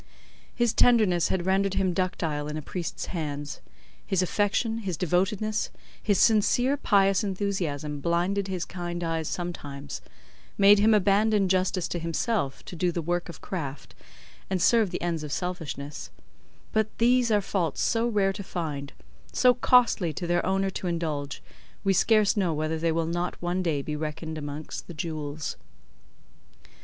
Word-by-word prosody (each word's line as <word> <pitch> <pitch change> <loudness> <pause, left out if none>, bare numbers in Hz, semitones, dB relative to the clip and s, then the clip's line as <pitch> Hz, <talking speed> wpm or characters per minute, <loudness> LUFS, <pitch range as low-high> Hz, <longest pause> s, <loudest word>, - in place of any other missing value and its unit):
His 240 -2 +2
tenderness 215 -8 +4
had 180 -2 -1
rendered 195 +1 +2
him 190 -2 +1
ductile 165 -5 -1
in 150 0 -4
a - - -4
priest's 175 +2 -4
hands, 145 -4 -4 0.4
his 190 -1 +1
affection, 210 +4 0
his 190 -7 -3
devotedness, 195 +5 0 0.3
his 205 -3 +2
sincere 245 +6 +4
pious 195 -6 +3
enthusiasm 180 -8 -2
blinded 175 +5 0
his 185 -2 -3
kind 175 -1 -5
eyes 165 -1 -1
sometimes, 145 -6 -5 0.6
made 200 +1 +7
him 215 +1 +5
abandon 205 +1 +3
justice 185 -1 +1
to 175 - -2
himself 165 - -1
to - - -8
do 175 +1 +1
the 170 - -3
work 175 +2 -1
of 170 - -10
craft, 145 -7 -5 0.6
and 190 -1 0
serve 225 +2 +4
the 175 - -4
ends 170 -2 -1
of 150 - -6
selfishness; 150 -5 -4 0.6
but 220 0 +2
these 245 +1 +4
are 210 -2 +4
faults 185 -5 -1
so 230 +1 +2
rare 200 -4 +2
to 200 - -6
find, 150 -7 -4 0.4
so 250 0 +5
costly 240 -8 +3
to 175 +4 -5
their 175 0 +1
owner 195 +1 +1
to 185 - -4
indulge, 155 -5 -3 0.4
we 195 -1 +3
scarce 215 +3 +4
know 180 -6 +1
whether 155 +1 -1
they 165 0 +1
will 165 0 0
not 175 +2 -2
one 175 +1 -1
day 155 -6 0
be 150 - -3
reckoned 155 +1 -4
amongst 145 +1 -6
the 170 - -9
jewels. 155 -2 -4
180 Hz, 155 wpm, -27 LUFS, 160-200 Hz, 0.6 s, made